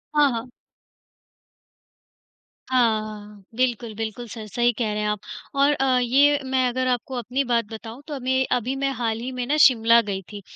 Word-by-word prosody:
हाँ, 295 -1 +6
हाँ। 235 +1 -5 2.2
हाँ, 235 -4 +3
हाँ, 210 -1 -10
बिल्कुल, 240 -2 -1
बिल्कुल, 225 +2 -5
सर 220 0 -7
सही 240 +4 +1
कह 220 -1 -2
रहे 210 - -2
हैं 210 - -1
आप 210 -1 -1 0.4
और 280 +1 +4
अ, 265 -2 +2
ये 280 +4 +4
मैं 260 -1 +1
अगर 255 +1 -1
आपको 250 +1 -2
अपनी 250 +4 -1
बात 235 -3 +1
बताऊँ, 225 +3 -9
तो 305 - -6
अमें 260 -1 0
अभी 250 +2 0
मैं 275 0 -1
हाल 225 -2 -1
ही 250 +3 -5
में 250 -1 -3
ना 300 +3 +1
शिमला 230 -3 +6
गई 200 -3 -4
थी। 205 -1 -8
245 Hz, 180 wpm, -23 LUFS, 225-260 Hz, 2.2 s, हाँ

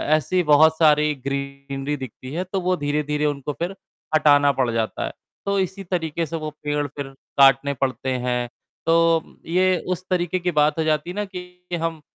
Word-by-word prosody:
ऐसी 170 +5 +1
बहुत 155 +1 +5
सारी 150 -1 +4
ग्रीनरी 140 +1 -3
दिखती 130 0 -8
है 175 +3 -1
तो 185 +1 -3
वो 180 +1 +1
धीरे-धीरे 150 0 -1
उनको 145 -1 -2
फ़िर 175 +6 -4 0.4
हटाना 145 -2 +5
पड़ 130 -3 0
जाता 115 -1 -1
है। - - -4 0.3
तो 200 0 +1
इसी 190 +1 -2
तरीक़े 170 -3 -2
से 160 - -6
वो 155 -1 -3
पेड़ 145 0 0
फ़िर 145 0 -6 0.3
काटने 135 +1 +5
पड़ते 130 -1 -2 0.2
हैं, 125 -1 0 0.4
तो 165 0 +4 0.2
ये 185 +2 +2 0.2
उस 180 - -14
तरीक़े 180 0 0
की 180 0 -1
बात 150 0 +2
हो - - +2
जाती 155 +1 0
है 180 - -5
ना 210 0 -1
कि 180 -2 -7
हम 165 -1 -2
155 Hz, 185 wpm, -23 LUFS, 140-175 Hz, 0.4 s, बहुत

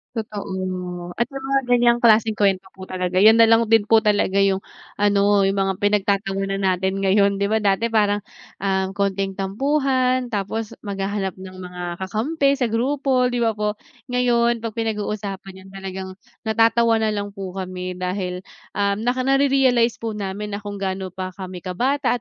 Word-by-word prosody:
Totoo 185 -4 -5
at 235 - +2
yung 270 - -5
mga 275 0 +3
ganyang 240 0 +4
klaseng 220 -2 +4
kuwento 195 -2 +1
po 190 - -8
talaga 185 -1 -3
yun 215 +3 +8
nalang 230 0 +5
din 225 0 +4
po 225 - +7
talaga 205 -3 +2
yung 195 -1 +3 0.3
ano 205 0 +3
yung 195 +1 +1
mga 195 0 +1
pinagtatawanan 195 -1 0
natin 190 +1 0
ngayon, 200 0 +2
di 200 - +1
ba 220 - +2
dati 210 +2 +1
parang, 205 -2 +2 0.4
um, 190 -1 0
konting 195 -1 -1
tampuhan 255 +4 0
tapos 210 +1 -3
maghahanap 195 -1 -2
ng 185 0 -11
mga 180 -1 -8
kakampi 275 +9 0
sa 255 -4 0
grupo 260 +2 +1
di 245 -1 -2
ba 225 -2 +1
po? 210 0 0 0.3
Ngayon, 240 -2 +2
pag 230 0 -6
pinag 220 -2 -1
uusapan 195 -2 -6
yun - - -13
talagang 190 -1 -6 0.4
natatawa 225 +1 +3
na 220 - +2
lang 205 -1 -3
po 195 -2 -6
kami 185 -1 -5
dahil, 180 0 -3 0.3
um, 200 +1 +1
naka 250 +2 0
narerealize 270 -4 +3
po 225 -1 -4
namin 205 0 -5
na 205 - -4
kung 205 0 -6
gaano 190 -1 -3
pa 185 0 -6
kami 185 -1 -7
kabata 255 +10 0
205 Hz, 165 wpm, -22 LUFS, 190-230 Hz, 0.4 s, yun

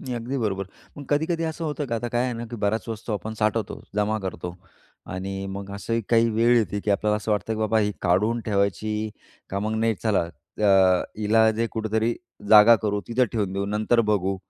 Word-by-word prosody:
नाही, 125 - -5
अगदी 120 +3 -3
बरोबर. 100 -4 -1 0.3
मग 145 - -7
कधी-कधी 160 +3 +1
असं 160 +1 -4
होतं, 150 -1 -3
का 115 - -2
आता 120 +1 -3
काय 120 0 0
आहे 125 - -1
ना, 115 0 -5
की 120 - -5
बऱ्याच 110 +3 0
वस्तू 110 0 -5
आपण 105 +2 -4
साठवतो, 110 -1 -1 0.2
जमा 105 +1 +1
करतो 90 -2 -5 0.6
आणि 95 +1 -4
मग 100 0 -6
असंही 115 +3 -2
काही 115 0 +4
वेळ 115 +2 +3
येते, 105 -2 0
की 105 - -2
आपल्याला 105 +1 +2
असं 105 +1 -4
वाटतं, 105 +2 -1
की - - -5
बाबा 110 0 +2
ही 105 -1 +1
काढून 105 +7 +2
ठेवायची 105 +1 0 0.4
का 100 - -1
मग, 110 +2 -2
नाही 115 0 +2
चला 100 -6 +1 0.3
अ, 105 - 0 0.5
हिला 110 +1 +4
जे 115 +1 -1
कुठेतरी 110 +1 0 0.4
जागा 110 +2 +9
करू, 105 -1 0
तिथं 125 +2 +2
ठेवून 105 -4 -1
देऊ, 100 0 -1
नंतर 105 +3 +2
बघू. 95 -2 +1
110 Hz, 205 wpm, -24 LUFS, 100-115 Hz, 0.6 s, जागा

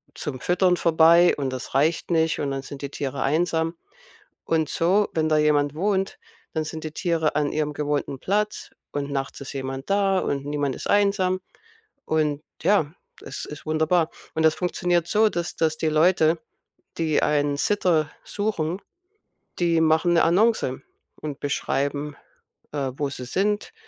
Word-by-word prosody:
zum 140 -5 -4
Füttern 180 0 +2
vorbei, 170 +1 +5
und 135 -2 -1
das 130 0 -6
reicht 160 +5 +1
nicht 160 -1 +2
und 140 -1 -1
dann 135 0 -3
sind 140 0 -9
die 140 - -3
Tiere 135 -1 -3
einsam. 160 +3 +1 0.7
Und 160 -2 +1
so, 190 +5 +2
wenn 155 -1 +1
da 155 - +3
jemand 150 -1 +2
wohnt, 195 +2 0 0.4
dann 160 -1 0
sind 160 0 -6
die 155 - -4
Tiere 165 -4 0
an 150 -1 +1
ihrem 150 -1 -1
gewohnten 145 -2 -2
Platz, 210 +2 -1 0.2
und 140 0 -3
nachts 135 0 -3
ist 140 - -7
jemand 135 +3 -5
da 195 -1 +3
und 140 0 -2
niemand 145 -2 -1
ist - - -6
einsam. 200 -2 +2 0.6
Und, 150 -1 0 0.2
ja, 170 -5 +2 0.3
es - - -5
ist 150 +1 -10
wunderbar. 160 +2 +2 0.3
Und 160 - +1
das 160 -1 +4
funktioniert 175 -1 0
so, 220 +1 +4
dass 170 -2 -3
dass 160 -1 +1
die 160 - 0
Leute, 160 +1 +4 0.6
die 155 -2 +1
einen 145 -1 +1
Sitter 170 -7 +2
suchen, 195 -4 -2 0.8
die 170 -2 +3
machen 160 +2 +3
'ne 170 - +4
Annonce 180 - +2 0.4
und 150 -3 -6
beschreiben, 145 +1 -1 0.6
äh, 135 -3 -1
wo 145 -2 -1
sie 125 -2 -7
sind, 205 - -1
160 Hz, 160 wpm, -24 LUFS, 145-175 Hz, 0.8 s, vorbei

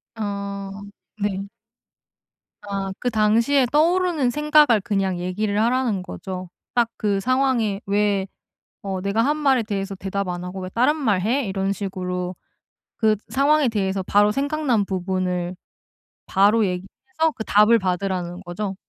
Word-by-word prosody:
아, 200 -2 -4 0.5
네. 200 -1 -2 1.1
아 200 -1 -4
그 250 - 0
당시에 230 +5 +3
떠오르는 330 -2 +2
생각을 295 -4 +4
그냥 195 -5 -1
얘기를 200 +4 -1
하라는 235 -4 +1
거죠. 185 -1 -7 0.2
딱 240 -1 +2
그 205 -3 0
상황에 245 -4 +1
'왜 200 -1 +1 0.6
어 190 -1 -2
내가 200 +3 +1
한 295 +4 +1
말에 270 -5 +3
대해서 200 -2 -3
대답 195 +1 -3
안 175 0 -4
하고 180 +1 -6
왜 185 - -5
다른 250 +9 +2
말을 215 -11 +1
해?' 245 +7 +1
이런 195 0 -1
식으로 185 -2 -4 0.6
그 220 -2 +3
상황에 285 +1 +3
대해서 195 -3 -1
바로 205 +3 +3
생각난 275 -4 0
부분을 185 -1 -2 0.7
바로 205 +4 +4
얘기해서 315 - -2
그 220 - -4
답을 210 +3 +5
받으라는 180 -2 -2
거죠? 190 +2 -4
205 Hz, 270 characters per minute, -22 LUFS, 190-245 Hz, 1.1 s, 답을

